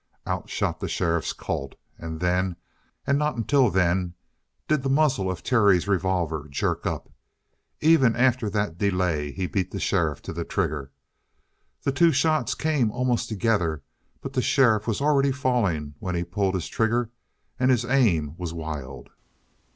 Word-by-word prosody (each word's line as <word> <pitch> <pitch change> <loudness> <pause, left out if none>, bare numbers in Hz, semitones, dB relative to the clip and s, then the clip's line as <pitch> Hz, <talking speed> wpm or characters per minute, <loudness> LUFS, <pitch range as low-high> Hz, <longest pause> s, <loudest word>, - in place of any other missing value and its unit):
Out - - -3
shot - - -2
the - - -3
sheriff's 85 -2 0
Colt. 70 0 -5 0.2
And 80 -1 -6
then, 90 +1 0 0.5
and 140 0 +2
not 150 -2 0
until 125 +2 +3
then, 90 -1 +1 0.5
did 155 -2 +2
the 135 - -2
muzzle 135 -9 +2
of 85 -6 -5
Terry's 100 -7 +3
revolver 90 -6 0
jerk 70 - -1
up. - - -4 0.7
Even 150 -7 +5
after 125 -2 +2
that 100 -5 -2
delay 90 -7 0
he 95 +5 -3
beat 95 -1 -1
the - - -5
sheriff - - 0
to - - -6
the 85 +1 -3
trigger. 75 -8 -2 0.9
The - - +1
two 165 +5 +4
shots 155 +2 +1
came 150 -8 +1
almost 125 +1 -1
together, 95 -9 0 0.4
but - - -6
the - - +1
sheriff 110 -5 +3
was 115 +2 -1
already 140 -1 +3
falling 110 - 0
when 90 -1 -3
he 85 - 0
pulled 95 +2 -1
his 90 - -2
trigger, 115 +1 0 0.5
and 130 0 +3
his 120 -2 +3
aim 100 - +2
was 85 -2 -4
wild. 70 -6 -6
100 Hz, 160 wpm, -25 LUFS, 85-130 Hz, 0.9 s, Even